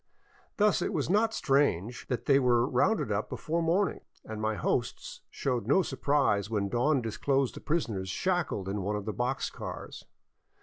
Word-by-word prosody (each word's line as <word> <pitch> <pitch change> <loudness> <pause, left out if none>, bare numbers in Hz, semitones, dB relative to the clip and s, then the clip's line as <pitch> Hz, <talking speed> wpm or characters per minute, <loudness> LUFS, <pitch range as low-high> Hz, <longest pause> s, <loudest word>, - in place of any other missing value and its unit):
Thus 210 -1 +3
it - - -1
was - - -1
not 220 +3 +3
strange 135 - +1
that 125 - -3
they 140 -1 +5
were 120 -2 +3
rounded 215 - +1
up 105 +1 -1
before 165 +2 -2
morning, 175 +5 +1 0.3
and 110 -1 -6
my 110 0 0
hosts - - -2
showed 125 -6 -2
no 185 +8 +4
surprise 135 - +1
when 100 -3 -1
dawn 125 +3 +2
disclosed 135 +4 0
the - - -8
prisoners 110 - -1
shackled 170 - -1
in 100 +1 -2
one 105 +3 -1
of 105 -1 -4
the 110 - -3
box - - -1
cars. - - -8
125 Hz, 170 wpm, -29 LUFS, 105-155 Hz, 0.3 s, they